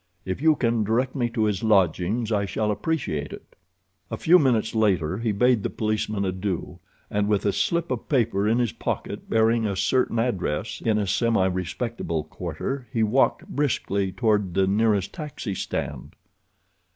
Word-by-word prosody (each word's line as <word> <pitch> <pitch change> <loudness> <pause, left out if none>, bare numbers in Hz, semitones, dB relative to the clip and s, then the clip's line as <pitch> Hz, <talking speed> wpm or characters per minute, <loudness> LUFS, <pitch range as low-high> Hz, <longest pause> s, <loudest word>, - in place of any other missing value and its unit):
If 95 +7 -3
you 160 0 +5
can 115 -4 +1
direct 120 +5 0
me 120 -4 0
to 115 -2 -1
his 105 -3 0
lodgings 100 +2 +2
I 100 -2 +1
shall 105 +3 -1
appreciate 105 - -2
it." - - -12 0.5
A - - -4
few 180 +3 +5
minutes 120 -6 +2
later 95 -5 +1
he 115 -1 0
bade 125 +2 +3
the - - -2
policeman 105 -2 -1
adieu, 95 -1 -3 0.3
and, 105 0 +1
with 105 -1 +1
a 100 - +2
slip 170 -3 0
of 125 - -4
paper 115 -7 +1
in 115 +2 +3
his 120 -3 +1
pocket 115 - -4
bearing 115 0 +3
a 100 - -2
certain 125 +4 +1
address 110 -4 -1
in 110 -2 +2
a 105 - 0
semirespectable 95 -4 -1
quarter, 95 - -5
he 115 - +1
walked 115 +5 +2
briskly 100 -9 -1
toward 105 -3 0
the 95 0 +3
nearest 100 0 +1
taxi 150 - -5
stand. - - -4
110 Hz, 165 wpm, -25 LUFS, 95-120 Hz, 0.5 s, you